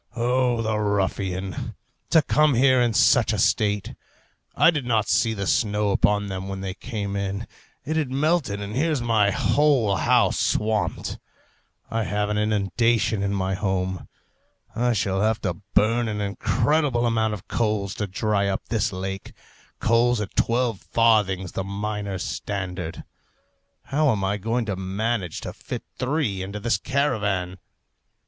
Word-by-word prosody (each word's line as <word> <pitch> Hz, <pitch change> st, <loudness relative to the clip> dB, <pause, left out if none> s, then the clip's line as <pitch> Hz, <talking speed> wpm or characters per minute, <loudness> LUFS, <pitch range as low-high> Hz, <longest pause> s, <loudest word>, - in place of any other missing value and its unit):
O 120 Hz, 0 st, +1 dB
the 110 Hz, -1 st, 0 dB
ruffian! 95 Hz, -3 st, -2 dB, 0.3 s
to 160 Hz, -, +5 dB
come 150 Hz, -1 st, +3 dB
here 130 Hz, +1 st, +4 dB
in 120 Hz, -1 st, +2 dB
such -, -, +4 dB
a -, -, -1 dB
state! 105 Hz, -1 st, +1 dB, 0.6 s
I -, -, +6 dB
did 150 Hz, -5 st, -2 dB
not 110 Hz, -3 st, +1 dB
see 110 Hz, -1 st, +2 dB
the 100 Hz, -1 st, -3 dB
snow 105 Hz, 0 st, +1 dB
upon 105 Hz, +1 st, +2 dB
them 95 Hz, -1 st, -5 dB
when 95 Hz, 0 st, -5 dB
they 95 Hz, -1 st, -4 dB
came 100 Hz, -2 st, -5 dB
in; 100 Hz, +2 st, -3 dB, 0.4 s
it 155 Hz, +3 st, -1 dB
had 150 Hz, -5 st, 0 dB
melted, 140 Hz, -6 st, 0 dB
and 100 Hz, +1 st, -5 dB
here's 155 Hz, +1 st, +1 dB
my 115 Hz, -4 st, +2 dB
whole 125 Hz, -2 st, +2 dB
house -, -, +3 dB
swamped. 110 Hz, -1 st, -1 dB, 0.7 s
I 115 Hz, -1 st, 0 dB
have 105 Hz, 0 st, -1 dB
an 105 Hz, 0 st, 0 dB
inundation 110 Hz, +1 st, +1 dB
in 100 Hz, 0 st, -1 dB
my 95 Hz, 0 st, -1 dB
home. 95 Hz, -1 st, -2 dB, 0.7 s
I 120 Hz, +1 st, +2 dB
shall 95 Hz, -2 st, 0 dB
have 110 Hz, +1 st, +1 dB
to 90 Hz, -3 st, -3 dB
burn 115 Hz, +3 st, +3 dB
an 105 Hz, -1 st, -3 dB
incredible 120 Hz, +6 st, +1 dB
amount 110 Hz, -2 st, +1 dB
of 95 Hz, -, -13 dB
coals 105 Hz, -4 st, -1 dB
to 105 Hz, -, -1 dB
dry 100 Hz, +1 st, 0 dB
up 95 Hz, -, -3 dB
this 110 Hz, -2 st, 0 dB
lake 95 Hz, +1 st, -5 dB, 0.5 s
coals 120 Hz, +1 st, +3 dB
at 105 Hz, -2 st, -5 dB
twelve 115 Hz, -3 st, +1 dB
farthings 105 Hz, -5 st, +2 dB
the 95 Hz, -, -3 dB
miners' 100 Hz, -1 st, -4 dB
standard! 90 Hz, -4 st, -4 dB, 0.8 s
How 150 Hz, +1 st, +1 dB
am 100 Hz, -4 st, -1 dB
I 100 Hz, +2 st, 0 dB
going 115 Hz, +4 st, -1 dB
to 100 Hz, -3 st, -2 dB
manage 95 Hz, 0 st, -2 dB
to -, -, -6 dB
fit -, -, -7 dB, 0.2 s
three 125 Hz, -8 st, -1 dB
into 100 Hz, +2 st, -5 dB
this 115 Hz, -2 st, 0 dB
caravan? 100 Hz, -10 st, -1 dB
105 Hz, 155 wpm, -24 LUFS, 100-120 Hz, 0.8 s, I